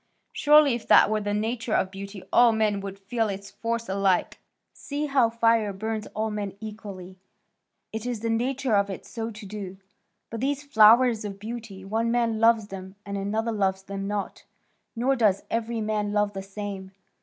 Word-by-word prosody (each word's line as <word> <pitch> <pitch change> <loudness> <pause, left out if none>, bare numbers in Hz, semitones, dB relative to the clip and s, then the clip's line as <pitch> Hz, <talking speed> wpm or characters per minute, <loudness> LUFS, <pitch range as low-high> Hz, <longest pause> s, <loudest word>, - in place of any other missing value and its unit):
Surely 295 -2 +5
if 235 -2 -5
that - - +6
were 215 0 +1
the 205 0 -2
nature 220 +2 -1
of 185 - +1
beauty, 195 0 -8
all 240 -1 +7
men 215 -2 +1
would 195 0 -6
feel 215 +3 -1
its 200 0 -6
force 230 0 -3
alike. 195 -1 +1 0.3
See 290 +1 -4
how 270 -5 +3
fire 230 -2 +2
burns 215 +2 -4
all 220 +1 -1
men 205 -2 -4
equally; 200 -4 -9 0.7
it 220 +2 -4
is 240 -4 -3
the 230 - -1
nature 255 +2 0
of 200 0 +2
it 190 - -7
so 225 -1 -5
to 215 -1 -10
do; 195 -2 -7 0.5
but 225 0 -5
these 280 +2 -1
flowers 235 -3 +5
of 200 -2 -6
beauty, 215 -3 -7
one 225 +3 0
man 230 -2 +1
loves 225 -2 +4
them, 190 0 -8
and 200 0 -5
another 215 +4 -1
loves 190 -3 0
them 195 0 -5
not, 205 -1 -4 0.5
nor 255 +4 +1
does 210 -5 +2
every 230 0 -1
man 210 -1 -1
love 210 0 +1
the 195 - -4
same. 195 -1 -7
215 Hz, 180 wpm, -26 LUFS, 200-230 Hz, 0.7 s, all